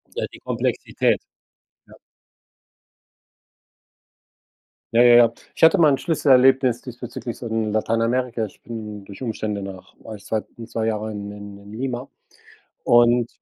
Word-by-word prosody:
Ja, - - -2
die - - -13
Komplexität, - - -1 0.7
ja. - - -17 3.0
Ja, 115 - +5
ja, 120 -1 +7
ja. 115 -1 +6 0.2
Ich - - +3
hatte 170 +4 +6
mal 155 -3 +6
'n 135 - +3
Schlüsselerlebnis 130 -4 +3
diesbezüglich 120 -1 -7
so 120 - -7
in 110 -1 -1
Lateinamerika. 115 +2 0
Ich 105 - -11
bin 105 -3 -8
durch 100 +4 -11
Umstände 110 -4 -3
nach 95 -1 -9
als 105 -2 -10
zw 110 -1 -1 0.2
2 115 -1 -3
Jahre 110 0 -2
in 100 0 -6
in 100 -1 -10
in 100 +1 -14
Lima 125 +2 -4 0.8
und 120 0 +4
115 Hz, 135 wpm, -22 LUFS, 105-125 Hz, 3.0 s, ja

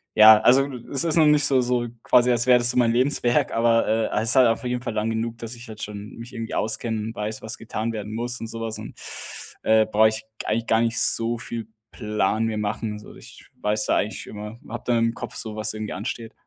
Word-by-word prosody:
Ja, 110 0 +9
also 135 +4 +4 0.2
es 135 - +3
ist 165 -1 +1
noch 160 - +6
nicht 150 -1 +4
so 135 -3 +3
so 120 -1 0 0.2
quasi 125 0 +4
als 120 +1 +1
wäre 125 -1 +6
das 120 0 +3
so 125 - -4
mein 120 -2 +4
Lebenswerk, 125 0 +1
aber, 115 0 +3
äh, 110 -1 0
es 115 - -1
ist 120 - +3
halt 130 -2 +6
auf 115 +3 0
jeden 125 0 -2
Fall 120 - -3
lang 110 +1 -1
genug, 115 +1 -3
dass 115 +1 -7
ich 120 +1 -12
halt 110 -1 -10
schon 105 0 -8
mich 115 +1 -10
irgendwie 115 -1 -5
auskenne 110 0 -1
und 110 +2 -5
weiß, 105 0 -4
was 110 - -5
getan 115 0 -4
werden 105 0 -6
muss 120 +2 -2
und 115 - -5
so 115 0 -7
was 110 -1 -3
und, - - -9 0.7
äh, 110 0 +4
brauche 110 0 +4
ich 110 0 -5 0.2
eigentlich 115 +2 -1
gar 110 0 +3
nicht 115 0 +1
so 115 +1 +2
viel 115 -2 -6 0.2
Plan 105 0 -1
mir 110 -1 -2
machen. 105 +1 -3
Also 105 0 -11
ich - - -14 0.2
weiß 105 0 0
da - - +2
eigentlich 105 - -3
immer, 105 +2 -8
habe 120 - -6
da 120 -1 +2
im 115 0 +1
Kopf - - -7
so 110 -1 -5
was 110 0 -2
irgendwie 110 0 -5
ansteht. 110 +3 -5
115 Hz, 245 wpm, -24 LUFS, 110-120 Hz, 0.7 s, Ja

